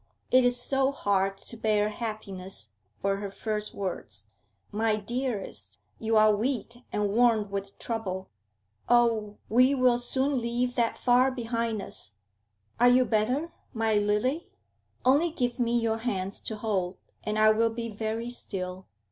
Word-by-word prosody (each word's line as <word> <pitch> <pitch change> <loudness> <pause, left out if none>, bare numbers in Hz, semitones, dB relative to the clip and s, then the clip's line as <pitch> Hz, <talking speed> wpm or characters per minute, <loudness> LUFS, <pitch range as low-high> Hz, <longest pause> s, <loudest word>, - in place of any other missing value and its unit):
'It 255 0 +6
is 245 0 +2
so 270 +2 +2
hard 195 -6 0
to 230 - -6
bear 215 -2 +1
happiness,' 195 - -5 0.3
were 195 0 +1
her 200 0 -4
first 210 +1 -1
words. 105 - -5 0.4
'My 220 +1 +1
dearest, 210 - -4 0.2
you 225 0 +2
are 215 -1 +6
weak 235 +1 -2
and 210 -1 0
worn 220 -2 +3
with 200 0 -4
trouble. 190 -5 -4 0.6
Oh, 230 -3 +3
we 255 +5 +4
will 250 -2 +4
soon 260 +2 0
leave 240 +1 0
that 235 -2 +1
far 250 +1 +4
behind 230 -4 -2
us. 105 - -7 0.6
Are 245 +1 +7
you 250 +1 +5
better, 250 +9 0 0.2
my 225 -1 +1
lily? 210 +9 +1 0.6
Only 285 +7 +4
give 245 -6 -2
me 240 0 +2
your 225 -1 0
hands 200 -4 -2
to 220 - -3
hold, 195 -4 -1 0.3
and 215 0 -2
I 215 0 +6
will 230 +1 +3
be 230 +1 -4
very 225 +2 -3
still. 185 -5 -5
225 Hz, 150 wpm, -28 LUFS, 205-245 Hz, 0.6 s, Are